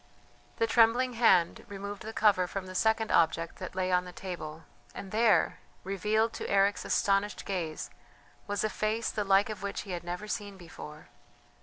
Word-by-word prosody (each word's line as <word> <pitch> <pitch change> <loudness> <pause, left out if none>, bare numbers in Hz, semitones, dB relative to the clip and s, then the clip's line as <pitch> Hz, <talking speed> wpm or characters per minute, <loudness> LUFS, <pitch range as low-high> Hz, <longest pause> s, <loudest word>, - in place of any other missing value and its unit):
The 230 - +2
trembling 240 +2 +4
hand 190 -8 +3
removed 200 0 -7
the 220 - -6
cover 205 -5 +3
from 195 +1 -5
the 185 - -8
second 220 +2 +1
object 165 0 +2
that 185 -1 -7
lay 185 0 0
on 180 0 +3
the 180 - -9
table, 165 -4 -7 0.3
and 195 - -7
there, 225 0 +3 0.2
revealed 215 +4 0
to - - -5
Eric's 200 +1 +3
astonished 200 0 +1
gaze, 170 -5 -3 0.6
was 205 0 -1
a 215 - +1
face 220 +2 -1
the 210 - -1
like 200 +2 +3
of 215 - -7
which 200 0 -3
he 195 - -8
had 175 -1 -4
never 180 +4 -5
seen 205 -3 -4
before. 155 -3 -11
200 Hz, 175 wpm, -30 LUFS, 180-215 Hz, 0.6 s, trembling